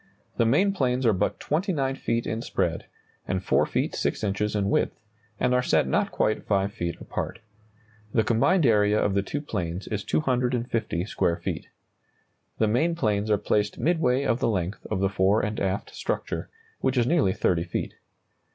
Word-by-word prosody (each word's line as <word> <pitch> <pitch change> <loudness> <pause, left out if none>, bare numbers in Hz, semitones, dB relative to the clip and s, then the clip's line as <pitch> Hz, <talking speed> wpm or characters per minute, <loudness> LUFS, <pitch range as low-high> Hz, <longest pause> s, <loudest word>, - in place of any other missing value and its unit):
The 115 - +3
main 185 - +3
planes 130 -6 0
are 115 - +5
but 100 +2 -1
29 150 -5 0
feet 115 -3 -1
in 110 +1 -2
spread, - - -2 0.4
and 95 -1 -1
4 - - +2
feet - - -1
6 - - -1
inches 105 +1 -1
in 100 -1 +1
width, - - +1 0.4
and 125 - +2
are 125 - +3
set 80 - +2
not 65 - +1
quite 110 - 0
5 100 0 +1
feet 85 -1 -4
apart. - - -4 0.7
The 110 - +3
combined 135 - +3
area 105 -2 +4
of 100 - +1
the 100 - +2
two 145 +9 -4
planes 90 - -4
is 105 -2 -3
250 125 - 0
square 85 -4 0
feet. - - -4 0.9
The 110 - +2
main 155 +10 +2
planes 105 -7 0
are 105 - +4
placed 105 0 0
midway 140 -6 +2
of 120 -3 +1
the - - +1
length 95 -2 -2
of 95 - -1
the 95 - +2
fore 95 +3 +2
and 105 +2 -3
aft 95 0 -2
structure, - - -3 0.3
which 130 - 0
is 120 - +4
nearly 140 - +3
30 85 -3 +1
feet. 85 - -3
110 Hz, 180 wpm, -26 LUFS, 100-125 Hz, 0.9 s, are